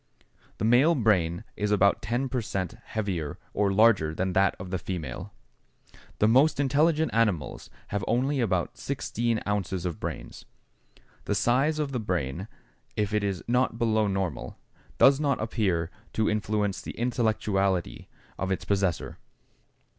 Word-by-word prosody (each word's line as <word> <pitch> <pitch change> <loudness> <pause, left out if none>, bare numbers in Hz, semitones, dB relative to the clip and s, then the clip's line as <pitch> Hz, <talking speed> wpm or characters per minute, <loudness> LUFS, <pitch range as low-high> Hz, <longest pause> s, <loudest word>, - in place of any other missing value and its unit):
The 105 - -1
male 130 +9 +5
brain 95 - +2
is 105 0 -1
about 100 -1 +3
ten 120 +5 -1
per 125 -1 -1
cent. 95 -2 -3
heavier 95 -9 -3 0.2
or 100 -1 +2
larger 95 -7 +4
than 95 +1 -1
that 95 0 +3
of 90 0 -8
the 95 - -1
female. 80 -8 -5 0.9
The 105 - +3
most 135 +6 +4
intelligent 150 +3 +2
animals 105 -9 0 0.2
have 105 0 -2
only 130 +5 +1
about 95 -8 -1
16 115 0 -1
ounces 95 -3 -2
of 85 -3 -3
brains. - - -6 0.8
The - - 0
size 135 +6 +2
of 150 -2 -1
the 125 - -2
brain, 90 - -2 0.5
if 105 -1 -1
it 105 -1 +1
is 95 -3 -2
not 125 +2 +1
below 110 -2 +2
normal, 95 -9 -3 0.4
does 135 +1 +6
not 140 -3 +1
appear 95 -7 0 0.2
to 110 -1 +1
influence 105 -2 0
the - - -8
intellectuality 105 - 0 0.3
of 95 0 -1
its 95 - -2
possessor. 95 -4 -1
105 Hz, 145 wpm, -27 LUFS, 95-120 Hz, 0.9 s, does